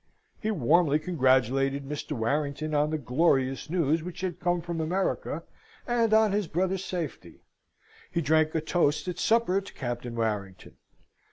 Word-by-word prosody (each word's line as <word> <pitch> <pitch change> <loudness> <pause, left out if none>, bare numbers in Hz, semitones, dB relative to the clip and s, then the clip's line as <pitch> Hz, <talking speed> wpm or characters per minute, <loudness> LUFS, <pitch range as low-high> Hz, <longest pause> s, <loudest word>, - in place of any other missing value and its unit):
He 220 - -1
warmly 160 - +3
congratulated 135 -3 +1
Mr. 150 +1 -4
Warrington 145 +5 -1
on 150 0 +2
the 155 - -1
glorious 135 0 +1
news 165 -2 +1
which 180 +1 -7
had 180 -2 -3
come 175 0 +1
from 170 -1 -4
America, 180 +5 -1 0.4
and 235 -2 +1
on 220 -1 +5
his 205 -2 0
brother's 185 +3 -1
safety. 160 - -6 0.7
He - - 0
drank 155 +1 +2
a 160 - +1
toast 155 -1 +1
at 180 0 -4
supper 225 -4 +2
to 195 - -12
Captain 120 -2 -4
Warrington. 105 -5 -3
155 Hz, 150 wpm, -28 LUFS, 135-180 Hz, 0.7 s, on